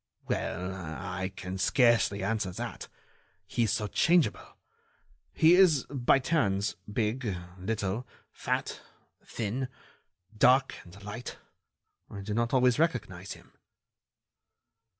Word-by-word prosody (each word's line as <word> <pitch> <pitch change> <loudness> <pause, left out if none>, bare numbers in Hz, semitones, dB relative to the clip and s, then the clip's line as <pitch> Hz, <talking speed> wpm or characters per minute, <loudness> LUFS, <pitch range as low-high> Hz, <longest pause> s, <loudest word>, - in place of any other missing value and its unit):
"Well, 90 +2 -2
I 95 +2 -5
can 95 +1 -6
scarcely 115 -4 +3
answer 105 -1 -1
that. - - -6 0.6
He 110 +5 -2
is 110 -3 +2
so 105 - 0
changeable. 170 - +1 0.7
He 165 +1 +5
is, 180 -7 +5
by 135 -2 +3
turns, 105 - 0 0.2
big, 110 -1 -1 0.2
little, 105 +3 -2 0.2
fat, - - -3 0.4
thin... 120 +4 -3 0.7
dark 130 +4 +4
and 95 +4 -14
light. 105 +4 -7 0.7
I 100 - -7
do 105 +2 -4
not 115 +1 0
always 125 0 +3
recognize 100 - -1
him." - - -17
110 Hz, 110 wpm, -29 LUFS, 95-125 Hz, 0.7 s, He